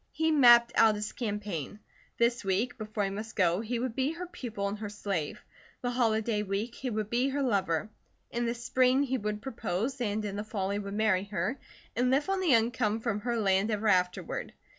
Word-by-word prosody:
He 320 Hz, 0 st, +1 dB
mapped 240 Hz, -5 st, +7 dB
out 220 Hz, -1 st, +5 dB
his 210 Hz, 0 st, -4 dB
campaign. 205 Hz, -, -4 dB, 0.4 s
This 235 Hz, +1 st, +2 dB
week, 195 Hz, +6 st, 0 dB
before 215 Hz, -1 st, -2 dB
he 195 Hz, -, -1 dB
must 220 Hz, +3 st, -6 dB
go, 180 Hz, -3 st, +3 dB
he 235 Hz, +2 st, -2 dB
would 240 Hz, -1 st, -3 dB
be 270 Hz, +4 st, 0 dB
her 355 Hz, +2 st, -6 dB
pupil 235 Hz, -, -4 dB
and 205 Hz, +1 st, -4 dB
her 210 Hz, -1 st, -4 dB
slave. 195 Hz, -7 st, -3 dB, 0.4 s
The 245 Hz, -, -1 dB
holiday 220 Hz, -3 st, +1 dB
week 210 Hz, +4 st, -2 dB
he 260 Hz, -, -4 dB
would 215 Hz, -2 st, -3 dB
be 250 Hz, +3 st, +2 dB
her 280 Hz, +1 st, -1 dB
lover. 195 Hz, -7 st, +1 dB, 0.4 s
In 235 Hz, 0 st, -1 dB
the 235 Hz, -, -1 dB
spring 255 Hz, +3 st, +2 dB
he 260 Hz, -2 st, -1 dB
would 210 Hz, +1 st, -3 dB
propose, 230 Hz, +1 st, -3 dB
and 210 Hz, -1 st, -1 dB
in 200 Hz, -1 st, -4 dB
the 210 Hz, -, -2 dB
fall 200 Hz, -3 st, -2 dB
he 200 Hz, -, -1 dB
would 200 Hz, 0 st, -5 dB
marry 210 Hz, -3 st, +2 dB
her, 200 Hz, +6 st, -2 dB, 0.4 s
and 250 Hz, +1 st, +2 dB
live 275 Hz, +7 st, +2 dB
on 390 Hz, -, +1 dB
the 340 Hz, -9 st, +4 dB
income 225 Hz, -1 st, +1 dB
from 225 Hz, -3 st, -1 dB
her 235 Hz, +2 st, -1 dB
land 195 Hz, -1 st, +2 dB
ever 215 Hz, 0 st, +1 dB
afterward. 180 Hz, -2 st, 0 dB
220 Hz, 205 wpm, -30 LUFS, 205-245 Hz, 0.4 s, mapped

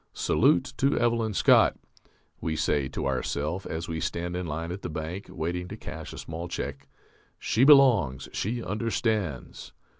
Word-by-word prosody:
Salute 85 Hz, -, +2 dB
to 135 Hz, +1 st, +2 dB
Evelyn 115 Hz, -3 st, +1 dB
Scott! -, -, +5 dB, 0.6 s
(we 80 Hz, -, -2 dB
say 75 Hz, -3 st, +1 dB
to -, -, -4 dB
ourself 70 Hz, +7 st, -2 dB
as 80 Hz, +1 st, -4 dB
we 80 Hz, -1 st, -3 dB
stand 85 Hz, +2 st, -3 dB
in 90 Hz, -1 st, -3 dB
line 80 Hz, +3 st, -4 dB
at 95 Hz, +2 st, -6 dB
the -, -, -5 dB
bank, 80 Hz, +5 st, -5 dB
waiting 90 Hz, +3 st, -3 dB
to -, -, -8 dB
cash -, -, -8 dB
a -, -, -9 dB
small 80 Hz, +2 st, -6 dB
check). 70 Hz, -5 st, -5 dB, 0.5 s
_She 130 Hz, +5 st, +2 dB
belongs, 115 Hz, -, +5 dB
she 115 Hz, +3 st, -2 dB
understands. 110 Hz, -, -2 dB
85 Hz, 155 wpm, -27 LUFS, 80-110 Hz, 0.6 s, Scott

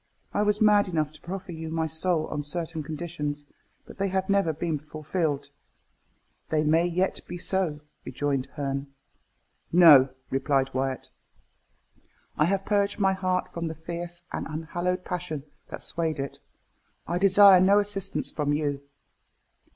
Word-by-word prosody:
"I 205 Hz, -, +1 dB
was 210 Hz, 0 st, +2 dB
mad 210 Hz, -1 st, +5 dB
enough 155 Hz, -4 st, -1 dB
to 155 Hz, -, -17 dB
proffer 190 Hz, +1 st, -6 dB
you 160 Hz, -1 st, -6 dB
my 160 Hz, 0 st, -1 dB
soul 160 Hz, +1 st, +1 dB
on 150 Hz, -, -3 dB
certain 160 Hz, +2 st, -4 dB
conditions; 150 Hz, -2 st, -4 dB, 0.4 s
but -, -, -13 dB
they 195 Hz, -, +1 dB
have 190 Hz, +1 st, -1 dB
never 195 Hz, -4 st, +3 dB
been 155 Hz, 0 st, -2 dB
fulfilled." 150 Hz, -1 st, -3 dB, 1.0 s
"They 155 Hz, -1 st, +1 dB
may 160 Hz, +3 st, +3 dB
yet 180 Hz, +2 st, -1 dB
be 175 Hz, -, -6 dB
so," 175 Hz, -5 st, 0 dB, 0.2 s
rejoined 140 Hz, -3 st, -2 dB
Herne. 140 Hz, -1 st, -4 dB, 0.8 s
"No," 155 Hz, -6 st, +8 dB, 0.2 s
replied 135 Hz, 0 st, +1 dB
Wyat, 130 Hz, 0 st, -2 dB, 1.2 s
"I 150 Hz, -, +3 dB
have 195 Hz, +2 st, 0 dB
purged 200 Hz, -1 st, +1 dB
my 195 Hz, -2 st, +3 dB
heart 185 Hz, -1 st, -1 dB
from 170 Hz, -1 st, -3 dB
the 160 Hz, -, -5 dB
fierce 175 Hz, +2 st, -6 dB
and -, -, -3 dB
unhallowed 175 Hz, +4 st, -3 dB
passion 175 Hz, -5 st, -4 dB, 0.2 s
that -, -, -8 dB
swayed 160 Hz, -2 st, -1 dB
it. 135 Hz, 0 st, -5 dB, 0.7 s
I 175 Hz, -, -1 dB
desire 195 Hz, -1 st, +7 dB
no 195 Hz, +2 st, +5 dB
assistance 205 Hz, -2 st, -1 dB
from 145 Hz, -1 st, -1 dB
you." 145 Hz, -2 st, -1 dB
165 Hz, 145 wpm, -26 LUFS, 150-185 Hz, 1.2 s, No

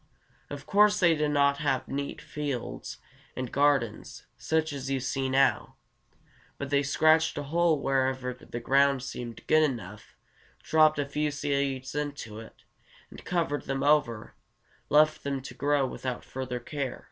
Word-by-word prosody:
Of 145 Hz, -1 st, -7 dB
course 210 Hz, +3 st, +4 dB
they 170 Hz, -4 st, +5 dB
did 150 Hz, -1 st, 0 dB
not 140 Hz, -1 st, +3 dB
have 135 Hz, -3 st, 0 dB
neat 140 Hz, +1 st, -4 dB
fields 145 Hz, -5 st, -5 dB, 0.4 s
and 130 Hz, -2 st, -4 dB
gardens, 140 Hz, -6 st, 0 dB
such 160 Hz, -1 st, -1 dB
as 135 Hz, -1 st, -5 dB
you 135 Hz, -1 st, 0 dB
see 130 Hz, +1 st, -2 dB
now; 135 Hz, 0 st, +2 dB, 0.8 s
but 140 Hz, 0 st, -6 dB
they 140 Hz, 0 st, +3 dB
scratched 155 Hz, +3 st, +3 dB
a 145 Hz, -, -2 dB
hole 165 Hz, +1 st, +2 dB
wherever 130 Hz, -2 st, 0 dB
the 120 Hz, -1 st, -8 dB
ground 135 Hz, +1 st, +3 dB
seemed 120 Hz, -3 st, -7 dB
good 155 Hz, -, +4 dB
enough, 110 Hz, -9 st, -3 dB, 0.5 s
dropped 155 Hz, -1 st, +4 dB
a 145 Hz, -, 0 dB
few 150 Hz, +2 st, -1 dB
seeds 140 Hz, -2 st, -2 dB
into 145 Hz, -7 st, -4 dB
it, 110 Hz, -, -14 dB, 0.5 s
and -, -, -12 dB
covering 165 Hz, -5 st, -1 dB
them 135 Hz, 0 st, -2 dB
over, 140 Hz, -7 st, +1 dB, 0.6 s
left 155 Hz, +1 st, +4 dB
them 140 Hz, -1 st, -2 dB
to 130 Hz, -, -8 dB
grow 145 Hz, -1 st, +1 dB
without 130 Hz, -1 st, -5 dB
further 130 Hz, -1 st, -5 dB
care. 135 Hz, +1 st, -4 dB
140 Hz, 150 wpm, -28 LUFS, 130-150 Hz, 0.8 s, they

